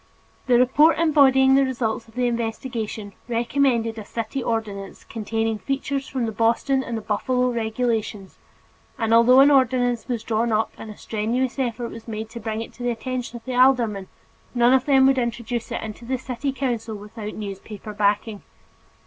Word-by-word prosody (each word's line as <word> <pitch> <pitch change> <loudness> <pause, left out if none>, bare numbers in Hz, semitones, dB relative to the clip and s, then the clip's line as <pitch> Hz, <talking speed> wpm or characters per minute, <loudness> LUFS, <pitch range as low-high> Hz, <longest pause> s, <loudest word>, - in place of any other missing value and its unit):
The 245 -1 +5
report 290 +6 +4
embodying 270 -5 +5
the 275 0 +5
results 235 -4 -2
of 225 - -20
the 250 0 0
investigation 225 -3 -3
recommended 235 -1 +1
a - - -7
city 230 +5 -4
ordinance 210 -4 -4
containing 225 0 -2
features 275 +1 -3
from 255 -3 -2
the 225 - -2
Boston 230 +5 +1
and 225 -3 -5
Buffalo 250 +4 0
regulations, 220 -3 -2 0.6
and 225 -2 0
although 245 +3 +7
an 285 +1 +6
ordinance 245 -4 +2
was 240 -4 -3
drawn 230 +1 0
up 220 0 +1
and 220 - -9
a 210 - -10
strenuous 240 +5 -2
effort 240 -2 -2
was 230 +1 -11
made 220 0 -5
to 235 - -7
bring 220 0 -3
it 230 - -8
to - - -14
the 245 - 0
attention 245 +1 -4
of 230 - -15
the 255 - -4
aldermen, 245 -6 +3 0.5
none 240 +1 +5
of 265 -1 +3
them 270 -2 +5
would 265 -1 +4
introduce 235 -1 -3
it - - -3
into 220 +1 -8
the 255 +2 -2
city 260 +2 -3
council 240 -5 -3
without 210 +1 -8
newspaper 210 +1 -7
backing. 210 +1 0
235 Hz, 175 wpm, -23 LUFS, 220-255 Hz, 0.6 s, although